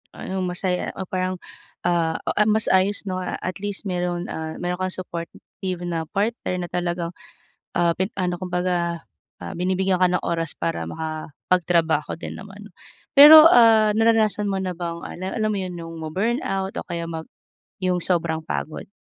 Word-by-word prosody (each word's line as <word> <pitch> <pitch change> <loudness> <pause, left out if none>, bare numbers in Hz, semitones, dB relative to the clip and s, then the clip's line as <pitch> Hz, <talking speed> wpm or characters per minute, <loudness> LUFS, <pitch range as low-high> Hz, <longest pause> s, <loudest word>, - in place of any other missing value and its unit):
Anong 190 0 -4
masaya 180 0 -1
o 190 - -4
parang, 185 0 -2 0.5
ah, 165 -2 +1
o - - +1 0.2
mas 220 +1 +2
ayos 195 +2 +2
'no 185 -1 -3
at 185 0 -4
least 205 +1 -4
meron, 180 -2 -2
ah, 160 0 -5
meron 180 +1 -3
kang 185 - 0
supportive 180 +1 -6
na 170 -2 -2
partner 205 -2 -1
na - - -11
talagang, 175 -1 -2 0.7
ah, 170 -1 +3
pin 190 +4 -1
ano 180 -1 0
kumbaga, 180 -4 -2 0.3
ah, - - -7
binibigyan 185 +1 0
ka 180 - +5
ng 180 - 0
oras 165 -3 -2
para 85 0 -2
makapagtrabaho 160 - -1
din - - -6
naman. 205 0 -11 0.5
Pero, 305 +3 +11
ah, 225 -6 +6
naranasan 215 -2 +2
mo 195 - -1
na 185 -1 -3
bang 170 -1 -5
al 180 - -9 0.2
alam 215 0 +1
mo 200 - -1
yun 180 -2 -5
yung 165 0 -8
ma-burnout 195 +2 -1
o - - -3
kaya 170 -1 -4
mag 160 -1 -7 0.5
yung 180 -1 0
sobrang 165 -3 0
pagod? 155 +1 -5
180 Hz, 160 wpm, -23 LUFS, 170-195 Hz, 0.7 s, Pero